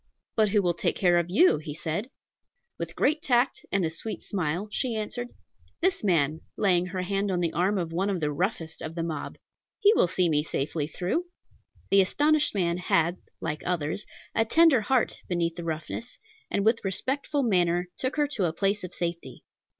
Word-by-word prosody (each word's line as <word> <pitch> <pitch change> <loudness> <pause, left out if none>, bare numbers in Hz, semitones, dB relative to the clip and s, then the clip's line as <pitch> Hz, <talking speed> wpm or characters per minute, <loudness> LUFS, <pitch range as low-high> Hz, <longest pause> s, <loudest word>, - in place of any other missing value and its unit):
"But 215 -2 +3
who 205 0 +2
will 175 -1 +2
take 170 - -1
care 175 -2 +4
of 170 0 -2
you?" 210 - +5
he 150 -1 -7
said. 170 +9 -3 0.7
With - - -5
great 310 +1 +2
tact 250 -1 +1
and 195 -3 +2
a 160 - -1
sweet 215 +7 -5
smile, 180 +1 -2
she 245 0 -1
answered, 230 +3 -3 0.5
"This 370 -5 +1
man," 160 -5 +2 0.2
laying 180 -3 +3
her 185 0 -3
hand 200 +2 -1
on 180 -2 0
the 170 -2 0
arm 190 +4 +1
of 170 -3 -3
one 190 +4 0
of 190 -3 -1
the 150 -2 0
roughest 165 0 -2
of 160 +1 -6
the 165 - -2
mob; 165 -2 -4 0.4
"he 415 +1 +6
will 380 - +4
see 180 0 +1
me 150 -2 +2
safe 150 -2 -3 0.2
through." 195 - -1 0.7
The 195 0 +7
astonished 295 +8 +2
man 170 -3 +1
had, 175 -1 +1 0.2
like 150 - -3
others, 175 +2 -2 0.3
a 225 - +3
tender 290 +2 +5
heart 245 +3 +1
beneath 170 -2 0
the 175 - -6
roughness, 165 +8 -5 0.3
and 200 - 0
with 225 +1 +3
respectful 275 +8 -1
manner 180 -5 +2
took 260 +1 -1
her 295 -1 +3
to 260 -10 -1
a 160 - 0
place 200 +3 0
of 180 - -6
safety. 170 -1 -4
185 Hz, 190 wpm, -27 LUFS, 170-225 Hz, 0.7 s, The